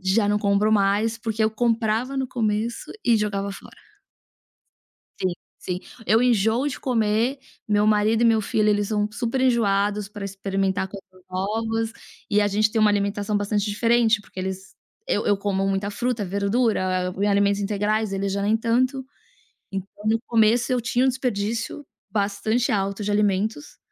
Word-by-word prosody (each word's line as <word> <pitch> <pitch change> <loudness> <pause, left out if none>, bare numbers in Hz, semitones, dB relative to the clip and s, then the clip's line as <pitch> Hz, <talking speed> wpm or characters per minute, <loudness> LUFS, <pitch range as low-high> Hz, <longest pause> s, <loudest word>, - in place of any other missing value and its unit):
Já 195 +3 +2
não 205 0 +2
compro 205 +1 +2
mais, 210 +2 +2
porque 225 -1 -1
eu 215 - +2
comprava 230 +2 0
no 265 -1 0
começo 230 -2 -2
e 235 -2 +4
jogava 200 -2 -2
fora. - - -13 1.4
Sim, 185 -1 0 0.3
sim. 180 0 -4 0.3
Eu 225 +3 +4
enjoo 235 +2 +2
de 275 - -6
comer, 230 +2 +1 0.3
meu 210 0 +3
marido 215 +2 +3
e - - +4
meu 225 -1 +4
filho 215 +1 +1
eles 205 -1 +1
são 210 -1 0
super 235 +4 -2
enjoados 210 -4 +1
pra 205 -1 -7
experimentar 195 -1 -2
coisas 190 -2 -13
novas, 225 +4 -2 0.4
e 210 0 +3
a 205 - +2
gente 215 +1 +2
tem 225 - 0
uma 215 -1 +5
alimentação 205 +1 0
bastante 205 0 0
diferente, 230 +1 +2
porque 195 - -14
eles 190 +1 -5 0.3
eu 205 - 0
eu 205 - +3
como 195 -1 -1
muita 195 +1 -1
fruta, 240 0 -2
verdura, 200 -2 0
hã, 200 +3 0
alimentos 200 0 +2
integrais, 210 +1 0
eles 195 0 -1
já 200 0 -1
nem 215 +2 +2
tanto. 255 +4 0 0.7
Então 195 0 -4 0.2
no 220 +1 +2
começo, 230 +2 +3
eu 250 -1 +1
tinha 245 +2 +1
um - - +4
desperdício 235 +1 -2 0.3
bastante 210 +4 0
alto 200 0 -1
de 205 - -1
alimentos, 210 +6 0
210 Hz, 165 wpm, -23 LUFS, 200-225 Hz, 1.4 s, uma